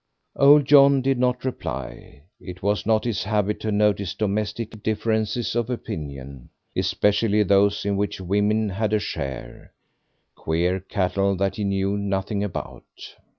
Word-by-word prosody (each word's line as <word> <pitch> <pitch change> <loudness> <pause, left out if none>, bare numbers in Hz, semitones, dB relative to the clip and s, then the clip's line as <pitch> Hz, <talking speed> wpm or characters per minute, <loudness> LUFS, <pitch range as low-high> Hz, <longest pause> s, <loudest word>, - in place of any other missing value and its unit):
Old 145 +1 +6
John 140 -1 +6
did 135 -1 +1
not 125 0 0
reply; 65 - -6 0.2
it 90 0 -10
was 105 +1 0
not 110 -1 +2
his 115 -6 -2
habit 105 0 0
to 110 - -3
notice 105 -2 +1
domestic 105 +1 -3
differences 110 +2 -1
of 120 0 -1
opinion, 70 - -7 0.3
especially 105 +1 +2
those 100 +1 +2
in 100 -1 0
which 100 -1 -2
women 105 +3 +1
had 105 +2 -2
a 110 - +3
share 65 -10 -6 0.6
queer 85 +4 -1
cattle 95 +1 -1
that 95 +1 -1
he 105 - -2
knew 100 0 0
nothing 100 +1 -2
about. 100 -4 -8
100 Hz, 140 wpm, -23 LUFS, 95-110 Hz, 0.6 s, Old